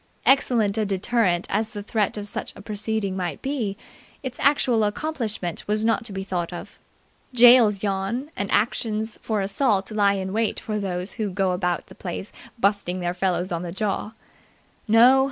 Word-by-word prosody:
Excellent 230 -6 +3
a - - +2
deterrent 195 -2 +1
as 215 +2 0
the 205 -1 -5
threat 210 -1 0
of 205 0 -5
such - - -4
a - - -11
proceeding 215 -2 -2
might 175 -6 -3
be, 240 -8 -2 0.5
its 255 -2 -6
actual 250 -6 +3
accomplishment 210 - -3
was 215 +1 +1
not 230 +1 +2
to 220 - -5
be 195 0 -4
thought 180 -3 -3
of. 175 - -9 0.6
Gaols 235 -4 +7
yawn 205 +8 -2
and 200 0 -3
actions 220 0 0
for 215 -3 -1
assault 200 0 +1
lie 205 -2 +3
in 190 0 -3
wait 225 0 0
for 215 -1 -3
those 185 -1 -3
who 215 -3 -3
go 190 0 0
about 180 -1 -1
the - - -14
place 185 +2 -6 0.3
busting 200 -4 0
their 175 0 -1
fellows 180 0 -1
on 170 -1 -2
the 175 -1 -5
jaw. 210 +2 -2 0.7
No. 240 +5 +7
205 Hz, 170 wpm, -24 LUFS, 190-225 Hz, 0.7 s, Gaols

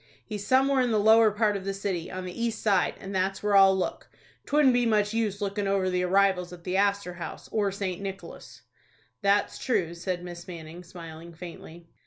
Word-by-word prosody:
He's 205 -2 -6
somewhere 265 +1 +4
in 250 - +1
the 220 - +2
lower 220 +1 +6
part 210 0 +1
of 195 - -4
the 195 0 -3
city, 190 -4 -3
on 185 0 -6
the 180 - -6
east 230 +1 -3
side, 195 -4 +2
and 195 +1 -7
that's 190 +1 -1
where 205 -1 +2
I'll 195 -1 +7
look. 185 - -3 0.4
'Twouldn't 285 -3 +4
be 245 0 +3
much 210 -1 +2
use 215 -3 -1
lookin' 200 0 -2
over 195 -1 +1
the 180 0 0
arrivals 180 -1 +2
at 175 -1 -11
the 180 +1 -2
Astor 200 -2 +1
House, 175 -1 -8
or 205 -2 +1
St. 190 -2 -4
Nicholas." 195 0 -8 0.6
"That's 200 0 +1
true," 180 -10 0
said 175 +1 -4
Miss 175 0 -9
Manning, 170 0 -9
smiling 165 -1 -11
faintly. 170 0 -10
195 Hz, 200 wpm, -27 LUFS, 180-210 Hz, 0.6 s, I'll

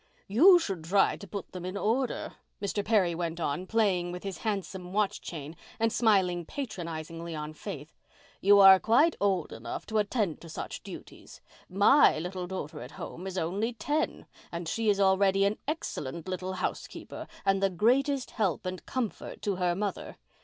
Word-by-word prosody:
"You 335 - +7
should 195 - -3
try 195 +4 +3
to 200 - -10
put 200 +2 -6
them 180 -1 -7
in 185 +2 -4
order," 240 +5 -1 0.3
Mr. 205 0 -2
Perry 200 -5 +3
went 165 0 -3
on, 165 +3 -2
playing 190 -6 +1
with 180 0 -7
his 195 -2 -5
handsome 190 -4 -4
watch 210 -1 0
chain 155 -1 -7 0.2
and 225 0 +2
smiling 190 -6 +3
patronizingly 165 - -6
on 150 0 -5
Faith. 155 -3 -8 0.5
"You 200 +1 +6
are 195 -1 +9
quite 285 - +4
old 190 -5 +1
enough 115 +1 -6
to 220 -1 0
attend 205 -5 -1
to 165 - -11
such - - -6
duties. - - -11 0.3
My 200 - +5
little 180 +2 -4
daughter 180 -5 -6
at 125 - -9
home 180 +3 -7
is 190 0 -5
only 195 +8 -1
ten 295 +7 -2 0.3
and 170 -1 -5
she 225 +5 0
is 200 -1 +2
already 195 0 +4
an 200 +2 0
excellent 170 - -4
little 185 0 -3
housekeeper 185 - -5 0.2
and 195 0 +3
the 195 - +3
greatest 255 - +1
help 195 -6 -1
and 185 0 -4
comfort 250 -5 -4
to 200 -3 -1
her 180 -1 +1
mother. 200 +1 -4
190 Hz, 170 wpm, -29 LUFS, 175-215 Hz, 0.5 s, are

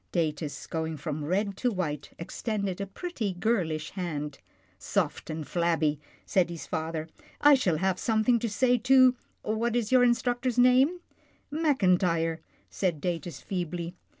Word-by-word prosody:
Datus, 155 -3 -2
going 160 -1 -3
from 150 +1 -4
red 195 +5 0
to 250 - +1
white, 150 -8 -3
extended 200 +1 -3
a 200 - -3
pretty, 220 - -4
girlish 175 -6 -1
hand. 150 -6 -4 0.2
" - - -36
Soft - - -1
and 155 -1 -4
flabby," 165 -4 +1 0.3
said 185 -3 +2
his 170 -2 -6
father. 160 0 -3 0.2
" - - -23
I 290 0 +8
shall 190 - +2
have 190 +2 0
something 225 +2 +2
to 230 - -2
say 245 +4 +2
to 255 +1 +6 0.2
— - - -42
what 225 +2 0
is, 235 -2 0
your 255 -1 +6
instructor's 245 0 +1
name? 260 +8 +5 0.2
" - - -34
" - - -41
Mackintyre," 180 - +2 0.3
said 175 -6 -1
Datus 170 -2 -3
feebly. 175 -2 -4
185 Hz, 160 wpm, -28 LUFS, 160-240 Hz, 0.3 s, I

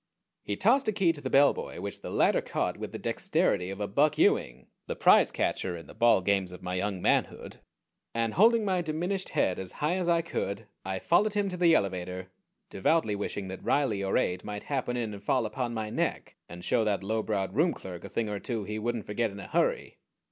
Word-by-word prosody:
He 100 - -3
tossed 260 +5 +3
a - - +3
key 190 -5 +2
to 145 - -8
the - - -3
bellboy, 140 +1 +3
which - - -6
the - - -6
latter - - +3
caught - - -2
with - - -6
the - - -5
dexterity 90 -1 0
of 100 +1 -6
a 105 - -2
Buck 145 +10 +2
Ewing, 65 +1 +2 0.2
the - - -3
prize - - +5
catcher 90 -2 -1
in 85 - -10
the - - -13
ball 115 -5 +4
games 95 -1 +1
of 90 - -11
my 90 - -3
young 95 0 -2
manhood, - - 0 0.5
and 115 -1 -1
holding 225 +3 +5
my 185 -2 +1
diminished 175 +4 -2
head 90 - +1
as 95 -1 -6
high 155 +5 0
as 180 -2 -1
I 170 -1 +3
could 115 -9 -3 0.2
I 95 0 -3
followed 205 - +2
him 205 -1 +1
to 180 - -5
the 170 -2 +5
elevator, 95 - -2 0.4
devoutly 110 - +1
wishing 100 -1 -4
that 95 - -7
Riley 115 -9 +1
or 95 - +1
Ade 90 0 0
might 105 0 -6
happen 130 -3 -2
in 115 -3 -3
and 100 -1 -10
fall 125 +2 +1
upon 120 +1 -3
my 110 -1 -3
neck, - - -2
and 90 0 -9
show 115 - +2
that 105 -3 0
low 110 +3 0
browed 100 -4 -2
room 160 - +3
clerk 90 - -8
a - - -8
thing 115 -1 -1
or 105 -1 -3
two 115 0 -3
he 105 +2 -4
wouldn't 120 -1 -2
forget 110 +2 -1
in 100 0 -10
a - - -8
hurry. - - 0
110 Hz, 225 wpm, -29 LUFS, 95-155 Hz, 0.5 s, prize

